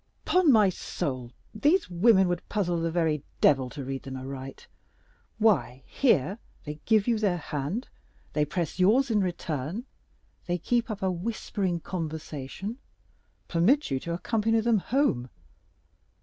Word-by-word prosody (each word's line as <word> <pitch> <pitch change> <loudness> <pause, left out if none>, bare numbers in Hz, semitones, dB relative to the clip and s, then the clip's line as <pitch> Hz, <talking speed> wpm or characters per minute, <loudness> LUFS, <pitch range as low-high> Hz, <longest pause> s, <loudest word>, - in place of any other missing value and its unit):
"Upon 365 -5 +4
my 215 -5 +6
soul, 130 -8 -4 0.2
these 300 - +2
women 190 +2 +4
would 175 -1 -3
puzzle 175 -5 0
the 165 - 0
very 160 -3 +1 0.2
Devil 135 -3 +4
to 140 +1 -7
read 135 0 -4
them 135 -1 -7
aright. 135 0 -7 0.7
Why, 195 - +2
here—they 170 - -1
give 220 -1 +3
you 230 -2 +2
their 195 -5 +1
hand—they 150 - -4
press 170 +2 -3
yours 230 +8 +4
in 215 - +3
return—they 175 - -5
keep 235 +7 0
up 210 -2 -4
a 190 - +2
whispering 185 -2 -2
conversation—permit 170 - -3
you 135 - +1
to 170 +5 -4
accompany 225 +4 +1
them 225 -1 +3
home. 185 - 0
180 Hz, 125 wpm, -27 LUFS, 150-220 Hz, 0.7 s, my